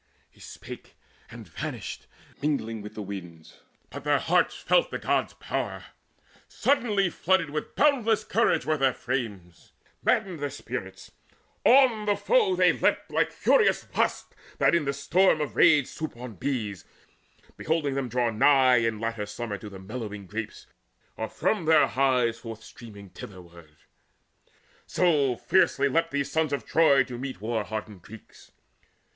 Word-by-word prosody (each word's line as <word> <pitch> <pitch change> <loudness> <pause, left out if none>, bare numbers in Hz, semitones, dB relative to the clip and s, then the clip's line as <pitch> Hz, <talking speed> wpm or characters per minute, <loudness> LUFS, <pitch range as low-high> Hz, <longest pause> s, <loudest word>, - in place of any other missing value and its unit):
He - - -25
spake, - - -11 0.3
and - - -11
vanished, - - -6 0.3
mingling 115 -7 -2
with 105 - -10
the 105 - -5
winds. 90 -5 -9 0.3
But 145 0 -8
their 145 0 +2
hearts 180 +6 +1
felt - - +2
the - - -4
God's - - -1
power: - - -4 0.6
suddenly 210 -9 +1
Flooded 170 -4 +1
with 150 0 -5
boundless 250 -7 +2
courage 230 - +1
were 155 0 +1
their 135 -2 +2
frames, 105 -10 -5 0.3
Maddened 185 -5 0
their 145 0 -2
spirits: 140 - -7 0.5
on 245 -5 +5
the 205 - +3
foe 440 - +2
they - - +4
leapt - - 0
Like - - +1
furious 455 - +2
wasps - - -1 0.2
that - - +3
in 170 -4 +1
a - - +2
storm 170 +4 +2
of 150 -2 -3
rage 150 -4 +5
Swoop 155 0 -6
upon 120 -1 -8
bees, 110 - -3 0.7
beholding 155 -3 -1
them 135 -2 -2
draw 120 0 0
nigh 130 +2 +5
In 115 -2 0
latter 115 -2 -3
summer 105 -2 -5
to 105 - -9
the 100 - -10
mellowing 105 0 -7
grapes, 105 +3 -6 0.5
Or 110 - -4
from 205 -7 -1
their 155 -1 +5
hives 125 -4 +1
forth 115 -2 -9
streaming 100 -4 -12
thitherward; 85 -5 -13 1.1
So 145 -8 +2
fiercely 140 -2 +2
leapt 165 +5 +1
these 140 -1 -2
sons 160 -1 0
of 140 - -3
Troy 150 -5 +4
to 125 -1 -8
meet 130 -7 -6
War 110 +1 -2
hardened 105 -2 -6
Greeks. 110 +4 -15
130 Hz, 150 wpm, -26 LUFS, 110-160 Hz, 1.1 s, on